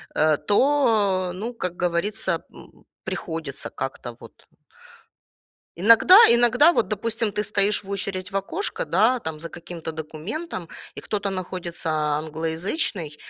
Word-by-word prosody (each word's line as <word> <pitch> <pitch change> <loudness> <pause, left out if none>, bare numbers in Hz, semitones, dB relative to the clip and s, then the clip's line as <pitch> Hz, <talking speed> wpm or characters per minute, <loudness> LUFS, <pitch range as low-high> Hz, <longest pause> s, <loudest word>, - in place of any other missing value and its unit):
э, 155 -1 +3
то, 210 -7 +2
ну, 220 +6 -5
как 180 -6 -4
говорится, 180 +5 0 0.2
м, - - -17 0.2
приходится 160 -5 -5
как-то 130 -2 -6
вот. - - -15 1.3
Иногда 230 - +7
иногда, 240 +7 +5
вот, - - 0
допустим, 225 +1 -1
ты 210 +1 -2
стоишь 205 0 +1
в 195 - -11
очередь 195 -1 -4
в 195 - -2
окошко, 330 - -2
да, 250 +4 +2
там 160 -6 -6
за 165 +2 -7
каким-то 170 -1 -8
документом, 165 - -6 0.3
и - - -5
кто-то 200 -1 -3
находится, 180 -3 -5 0.3
англоязычный, 160 - -3
190 Hz, 125 wpm, -23 LUFS, 165-220 Hz, 1.3 s, Иногда